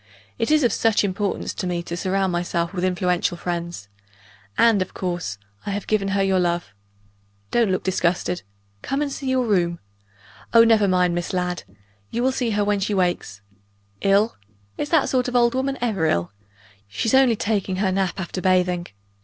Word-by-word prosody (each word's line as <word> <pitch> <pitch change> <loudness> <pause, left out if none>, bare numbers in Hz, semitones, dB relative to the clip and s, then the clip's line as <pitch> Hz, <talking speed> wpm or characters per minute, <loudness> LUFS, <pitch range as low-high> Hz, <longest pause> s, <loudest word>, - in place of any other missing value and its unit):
It 225 - 0
is 305 -1 +4
of 240 - +3
such 225 -2 +2
importance 200 0 -2
to 185 - -4
me 175 -1 -2
to 170 - -5
surround 190 +1 0
myself 175 0 -1
with 180 -2 -3
influential 180 -1 0
friends 170 - -4 0.7
and, 230 -4 +5
of 185 - -4
course, 175 - -3 0.3
I - - -5
have 200 0 -3
given 210 -2 0
her 195 - +3
your 190 -1 +2
love. 175 -8 -1 0.8
Don't 235 -3 +3
look 185 - 0
disgusted! 180 -1 0 0.4
Come, 275 +2 -1
and 285 - -3
see 270 -1 -4
your 260 -1 +2
room. 175 -5 +1 0.8
Oh, 230 - +9
never 220 -3 +4
mind 180 -2 +2
Miss 175 +1 -3
Ladd. 180 -1 -2 0.4
You 235 - -2
will 260 - +3
see 250 -2 -1
her 205 -1 +1
when 205 0 +1
she 200 +1 -1
wakes. 175 - -1 0.6
Ill? 200 +3 +3 0.4
Is 290 - -3
that 320 -4 +3
sort 255 -1 +1
of 250 - -4
old 235 -1 +4
woman 270 +1 -1
ever 210 -9 +1
ill? 85 - 0 0.6
She's 160 - -2
only 265 -3 +5
taking 205 -3 -1
her 190 0 +1
nap 190 0 -1
after 185 0 -4
bathing. 180 -1 +2
190 Hz, 180 wpm, -23 LUFS, 175-225 Hz, 0.8 s, Oh